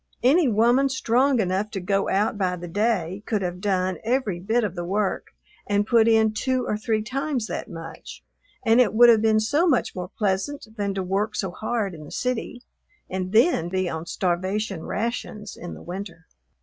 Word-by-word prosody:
Any 295 Hz, +5 st, +5 dB
woman 240 Hz, +5 st, +3 dB
strong 260 Hz, 0 st, +2 dB
enough 195 Hz, +1 st, 0 dB
to 205 Hz, -, -4 dB
go 195 Hz, +2 st, 0 dB
out 210 Hz, +4 st, +1 dB
by 185 Hz, -3 st, 0 dB
the 175 Hz, 0 st, -7 dB
day 200 Hz, -1 st, 0 dB
could 210 Hz, -4 st, 0 dB
have 180 Hz, 0 st, -4 dB
done 185 Hz, -3 st, 0 dB
every 225 Hz, -6 st, 0 dB
bit 220 Hz, +6 st, +1 dB
of 205 Hz, -5 st, -2 dB
the 175 Hz, -2 st, -4 dB
work 195 Hz, +3 st, -1 dB, 0.4 s
and 205 Hz, 0 st, +1 dB
put 230 Hz, 0 st, +4 dB
in 220 Hz, -1 st, +4 dB
two 255 Hz, +3 st, 0 dB
or -, -, -1 dB
three 215 Hz, 0 st, -1 dB
times 265 Hz, +1 st, -2 dB
that -, -, -5 dB
much, 165 Hz, 0 st, -9 dB, 0.4 s
and 225 Hz, +2 st, +6 dB
it 220 Hz, -3 st, +1 dB
would 240 Hz, +1 st, +8 dB
have 225 Hz, -2 st, +6 dB
been 220 Hz, -1 st, +3 dB
so 290 Hz, +11 st, +2 dB
much 265 Hz, -7 st, +1 dB
more 180 Hz, -1 st, -5 dB
pleasant 210 Hz, +8 st, -2 dB
than 200 Hz, -2 st, -2 dB
to 190 Hz, -, -1 dB
work 200 Hz, +4 st, -1 dB
so 190 Hz, -3 st, -2 dB
hard 215 Hz, 0 st, -2 dB
in 155 Hz, -2 st, -10 dB
the 150 Hz, -, -12 dB
city 250 Hz, 0 st, -3 dB, 0.5 s
and 185 Hz, 0 st, -3 dB
then 220 Hz, -, +3 dB
be 185 Hz, 0 st, -1 dB
on 160 Hz, 0 st, -5 dB
starvation 185 Hz, +1 st, -1 dB
rations 215 Hz, -2 st, -4 dB
in 175 Hz, -, -8 dB
the -, -, -12 dB
winter. 175 Hz, -2 st, -7 dB
210 Hz, 190 wpm, -24 LUFS, 185-235 Hz, 0.5 s, would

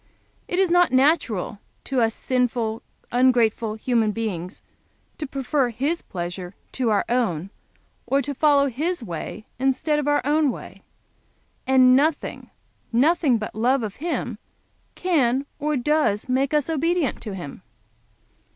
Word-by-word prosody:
It 355 Hz, -, -2 dB
is 380 Hz, -2 st, +3 dB
not 355 Hz, 0 st, +4 dB
natural 255 Hz, -, +2 dB, 0.2 s
to 265 Hz, -3 st, 0 dB
us 225 Hz, -1 st, +1 dB
sinful, 240 Hz, -3 st, -1 dB, 0.3 s
ungrateful 235 Hz, -3 st, +2 dB
human 225 Hz, -1 st, +1 dB
beings 200 Hz, -5 st, -4 dB, 0.6 s
to 300 Hz, -, -3 dB
prefer 270 Hz, -1 st, 0 dB
His 280 Hz, +9 st, -1 dB
pleasure 175 Hz, +1 st, -6 dB, 0.2 s
to 250 Hz, -3 st, -1 dB
our 210 Hz, -2 st, +2 dB
own, 195 Hz, -8 st, -1 dB, 0.6 s
or 275 Hz, -, +2 dB
to 285 Hz, -, -3 dB
follow 285 Hz, 0 st, +4 dB
His 305 Hz, +5 st, -2 dB
way 205 Hz, +3 st, -6 dB
instead 270 Hz, +3 st, +1 dB
of 295 Hz, -, -2 dB
our 290 Hz, 0 st, +3 dB
own 300 Hz, 0 st, +3 dB
way, -, -, -8 dB, 0.9 s
and 255 Hz, -1 st, +6 dB
nothing, 295 Hz, +3 st, 0 dB, 0.4 s
nothing 280 Hz, +1 st, +3 dB
but 215 Hz, -, -5 dB
love 245 Hz, +5 st, +2 dB
to 215 Hz, -, -2 dB
Him 250 Hz, -, -4 dB, 0.6 s
can 275 Hz, -7 st, +1 dB
or 300 Hz, 0 st, 0 dB
does 265 Hz, -6 st, +1 dB
make 260 Hz, +2 st, +1 dB
us 300 Hz, -2 st, +1 dB
obedient 325 Hz, -1 st, 0 dB
to 210 Hz, -4 st, -5 dB
Him." 175 Hz, -2 st, -8 dB
255 Hz, 135 wpm, -23 LUFS, 220-295 Hz, 0.9 s, and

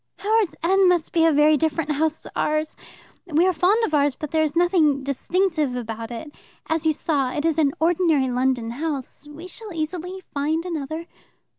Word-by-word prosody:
"Howards 430 Hz, -2 st, +1 dB
End 380 Hz, +2 st, +4 dB
must 350 Hz, -3 st, +1 dB
be 330 Hz, -1 st, +4 dB
a -, -, +4 dB
very 300 Hz, +1 st, +5 dB
different 310 Hz, 0 st, -1 dB
house 315 Hz, +2 st, -1 dB
to -, -, -9 dB
ours. 310 Hz, 0 st, -1 dB, 0.5 s
We 330 Hz, +1 st, +3 dB
are 370 Hz, -, +3 dB
fond 390 Hz, +8 st, +3 dB
of 315 Hz, -, -5 dB
ours, 285 Hz, -2 st, +2 dB
but 305 Hz, -, -6 dB
there 315 Hz, -, +2 dB
is 310 Hz, -1 st, 0 dB
nothing 335 Hz, -6 st, +3 dB
distinctive 305 Hz, 0 st, 0 dB
about 225 Hz, -2 st, -5 dB
it. 245 Hz, +6 st, -7 dB, 0.3 s
As 320 Hz, 0 st, 0 dB
you -, -, +5 dB
saw, 285 Hz, -4 st, -1 dB
it 295 Hz, +3 st, -2 dB
is 325 Hz, -1 st, +1 dB
an 285 Hz, -3 st, +3 dB
ordinary 325 Hz, -4 st, +2 dB
London 250 Hz, -2 st, 0 dB
house. 285 Hz, +1 st, -4 dB
We 300 Hz, +4 st, -10 dB
shall 430 Hz, +2 st, -9 dB
easily 360 Hz, +3 st, -4 dB
find 310 Hz, +4 st, -1 dB
another." 320 Hz, -1 st, -4 dB
315 Hz, 185 wpm, -23 LUFS, 285-340 Hz, 0.5 s, very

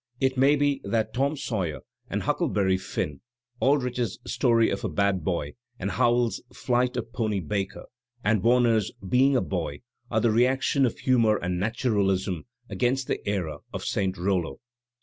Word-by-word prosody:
It 130 Hz, -1 st, +1 dB
may 135 Hz, +3 st, +5 dB
be 145 Hz, -1 st, +1 dB
that 110 Hz, -2 st, -1 dB
"Tom 140 Hz, +4 st, 0 dB
Sawyer" 95 Hz, -, -3 dB, 0.3 s
and -, -, -2 dB
"Huck -, -, 0 dB
leberry 95 Hz, -2 st, +1 dB
Finn," 75 Hz, -5 st, -4 dB, 0.4 s
Aldrich's 125 Hz, -6 st, +1 dB
"Story 120 Hz, -2 st, +2 dB
of -, -, -3 dB
a 110 Hz, -, -1 dB
Bad 95 Hz, +1 st, +1 dB
Boy," 75 Hz, -4 st, -2 dB, 0.3 s
Howells's 120 Hz, +4 st, +1 dB
"Flight 125 Hz, 0 st, 0 dB
of 115 Hz, -, -5 dB
Pony 110 Hz, -4 st, 0 dB
Baker," 100 Hz, +4 st, -3 dB, 0.4 s
and 105 Hz, -1 st, +2 dB
Warner's 115 Hz, -2 st, +3 dB, 0.2 s
"Being 135 Hz, +5 st, +4 dB
a 125 Hz, -, +3 dB
Boy" 80 Hz, -6 st, -3 dB, 0.3 s
are 110 Hz, -, +1 dB
the 115 Hz, 0 st, +3 dB
reaction 130 Hz, +3 st, +3 dB
of 115 Hz, -, -5 dB
humour 115 Hz, -5 st, +3 dB
and 90 Hz, -1 st, -2 dB
naturalism 100 Hz, -5 st, 0 dB, 0.2 s
against 125 Hz, +6 st, 0 dB
the -, -, -3 dB
era 85 Hz, -7 st, -2 dB
of -, -, -5 dB
St 95 Hz, -2 st, 0 dB
Hollo. 90 Hz, -2 st, -1 dB
110 Hz, 155 wpm, -26 LUFS, 95-125 Hz, 0.4 s, may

